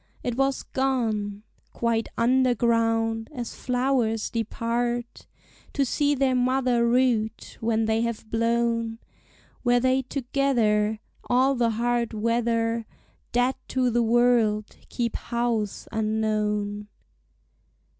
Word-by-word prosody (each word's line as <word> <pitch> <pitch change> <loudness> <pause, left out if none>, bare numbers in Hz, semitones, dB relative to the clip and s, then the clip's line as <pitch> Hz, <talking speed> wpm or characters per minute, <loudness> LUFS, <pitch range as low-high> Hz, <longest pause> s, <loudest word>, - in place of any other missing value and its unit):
It 245 - -2
was 270 +1 0
gone 220 -6 -1 0.3
Quite 230 -1 0
underground; 230 -2 +2
as 240 -3 -5
flowers 250 -3 0
depart 235 +1 -2 0.5
To 280 - +1
see 290 +3 +1
their 270 -1 +2
mother 250 -1 +2
root, 235 -3 0
when 225 0 +1
they 220 +1 +1
have 235 -1 -3
blown; 230 0 0 0.6
Where 245 -1 +3
they 260 +1 +2
together 240 -5 0 0.3
All 260 +2 +3
the 240 -3 +1
hard 235 +1 0
weather, 230 0 0 0.4
Dead 245 +2 +2
to 255 -2 +1
the 240 +1 +2
world, 230 -2 +2
keep 235 -2 -2
house 235 -4 -2
unknown. 215 -1 -1
235 Hz, 105 wpm, -25 LUFS, 225-250 Hz, 0.6 s, Where